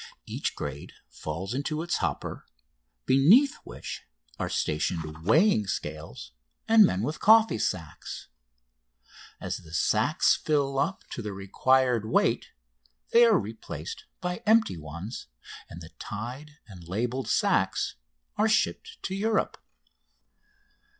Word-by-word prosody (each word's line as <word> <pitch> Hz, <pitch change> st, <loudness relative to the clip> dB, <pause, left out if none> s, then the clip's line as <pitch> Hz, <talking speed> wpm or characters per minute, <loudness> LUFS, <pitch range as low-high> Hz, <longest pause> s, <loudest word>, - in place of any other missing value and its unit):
Each -, -, -3 dB
grade 70 Hz, 0 st, -6 dB, 0.2 s
falls 90 Hz, +7 st, -5 dB
into 150 Hz, +4 st, -2 dB
its 175 Hz, -, -1 dB
hopper, -, -, -3 dB, 0.6 s
beneath 195 Hz, -, +5 dB
which -, -, -7 dB, 0.4 s
are -, -, -2 dB
stationed 80 Hz, 0 st, -2 dB
weighing 155 Hz, -, +4 dB
scales 75 Hz, -8 st, -5 dB, 0.4 s
and 225 Hz, -1 st, +8 dB
men 95 Hz, +3 st, -1 dB
with 150 Hz, +6 st, -3 dB
coffee 220 Hz, -, +5 dB
sacks. 80 Hz, -6 st, -4 dB, 1.1 s
As -, -, -3 dB
the 80 Hz, 0 st, -10 dB
sacks -, -, +3 dB
fill 140 Hz, -3 st, 0 dB
up 165 Hz, +7 st, -1 dB
to -, -, -5 dB
the 105 Hz, -2 st, -5 dB
required 120 Hz, +4 st, +2 dB
weight -, -, +2 dB, 0.7 s
they 235 Hz, +1 st, +8 dB
are 225 Hz, -2 st, +5 dB
replaced 110 Hz, +1 st, -6 dB, 0.2 s
by 180 Hz, 0 st, -2 dB
empty 220 Hz, -, +4 dB
ones, 85 Hz, -, -7 dB, 0.4 s
and 85 Hz, -, -10 dB
the 80 Hz, -, -10 dB
tied 130 Hz, +8 st, -7 dB
and 90 Hz, -5 st, -12 dB
labelled 120 Hz, +8 st, -2 dB
sacks -, -, +1 dB, 0.4 s
are 215 Hz, +1 st, +3 dB
shipped 450 Hz, -, 0 dB
to 190 Hz, -, -3 dB
Europe. 215 Hz, +3 st, 0 dB
125 Hz, 120 wpm, -27 LUFS, -, 1.1 s, and